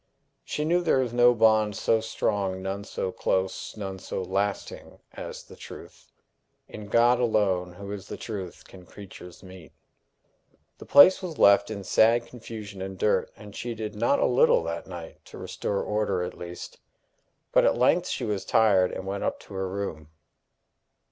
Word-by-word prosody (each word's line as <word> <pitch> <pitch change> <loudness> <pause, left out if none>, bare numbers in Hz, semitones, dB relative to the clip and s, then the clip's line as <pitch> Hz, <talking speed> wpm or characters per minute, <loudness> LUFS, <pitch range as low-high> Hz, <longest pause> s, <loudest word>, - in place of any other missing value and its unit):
She 150 - -3
knew 175 +3 +2
there 145 -6 +2
is 120 -2 -5
no 120 0 +5
bond 110 -2 +3
so 115 - +2
strong, 100 -4 -2
none 95 +1 -4
so 95 - -4
close, 95 +3 -2
none 95 -2 -5
so 95 - -5
lasting 100 +2 -3 0.2
as - - -8
the - - -15
truth. - - -13 0.6
In 105 -1 -9
God 120 +3 +4
alone, 95 -7 +1
who 100 +2 -9
is 100 -2 -7
the - - -7
truth, 95 -6 -7
can 95 -1 -14
creatures 90 -1 -12
meet. 95 -3 -13 1.1
The - - -12
place 185 +8 +7
was 175 -4 -6
left 100 0 +5
in 100 -3 -6
sad 115 +4 +3
confusion 110 -5 -9
and 95 0 -6
dirt, 105 - +1
and 105 -2 -13
she 120 -1 -5
did 110 -1 -5
not 120 +6 +2
a - - +2
little 125 -8 +4
that 85 0 -5
night 85 -3 -10
to - - -12
restore 100 - -3
order 105 -4 -1
at 90 - -5
least. 85 0 -9 0.7
But - - +4
at - - +3
length - - +3
she - - -3
was 100 -3 -2
tired, 100 -5 +3
and 95 - -6
went 100 +1 -4
up - - -2
to - - -14
her 95 -1 -3
room. 90 -6 -5
100 Hz, 175 wpm, -26 LUFS, 95-110 Hz, 1.1 s, place